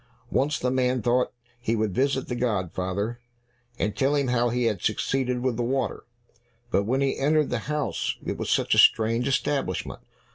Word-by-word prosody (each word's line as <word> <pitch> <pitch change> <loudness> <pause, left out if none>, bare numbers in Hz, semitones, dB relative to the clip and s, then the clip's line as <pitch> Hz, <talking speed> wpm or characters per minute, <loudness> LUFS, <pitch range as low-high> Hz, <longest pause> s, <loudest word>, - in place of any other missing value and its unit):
Once 150 +3 +1
the 125 -3 -1
man 130 -1 +1
thought 120 +3 +1 0.3
he 115 -1 0
would 110 -3 0
visit 135 +2 0
the - - -3
godfather, 100 -1 -2 0.6
and 105 0 -1
tell 135 +4 +2
him 140 -3 +1
how 120 -1 +2
he 125 +1 0
had 105 -6 0
succeeded 125 +2 0
with 125 -2 0
the - - -1
water. 130 +3 -2 0.7
But 100 - +2
when 130 +5 +1
he 135 -1 0
entered 150 +2 +2
the - - 0
house, 150 -1 -1
it - - -2
was - - -4
such - - +2
a - - +4
strange 115 +3 +4
establishment! 140 +1 -1
125 Hz, 180 wpm, -26 LUFS, 115-135 Hz, 0.7 s, a